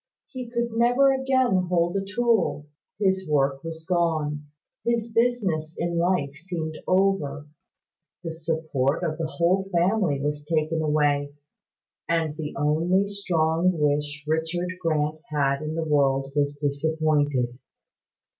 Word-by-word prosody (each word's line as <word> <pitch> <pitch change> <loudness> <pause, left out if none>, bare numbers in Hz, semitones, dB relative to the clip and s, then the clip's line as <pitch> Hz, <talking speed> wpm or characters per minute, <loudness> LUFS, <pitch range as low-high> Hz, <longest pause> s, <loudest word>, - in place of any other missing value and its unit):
He 255 -3 -7
could 235 0 -1
never 245 +4 +4
again 260 -8 +2
hold 175 0 +1
a 195 - 0
tool; 200 -7 +1 0.3
his 190 -3 0
work 135 -2 +1
was 160 -1 -7
gone, 155 -4 0 0.4
his 235 -1 0
business 205 -10 0
in 170 0 -1
life 170 -5 +1
seemed 160 -2 -5
over, 185 -6 +1 0.8
the 165 - -3
support 160 -3 -1
of 160 -1 -2
the 165 - -1
whole 185 +4 +1
family 175 -4 +2
was 145 +1 -2
taken 160 +1 0
away 145 -2 +1 0.7
and 165 -3 0
the 150 -2 -5
only 165 +7 +2
strong 180 -3 +1
wish 150 0 0
Richard 165 +3 -1
Grant 155 -2 0
had 140 -2 0
in 155 +1 -4
the 165 - -1
world 135 -2 +2
was 145 0 +1
disappointed." 145 -3 0
160 Hz, 125 wpm, -25 LUFS, 150-185 Hz, 0.8 s, never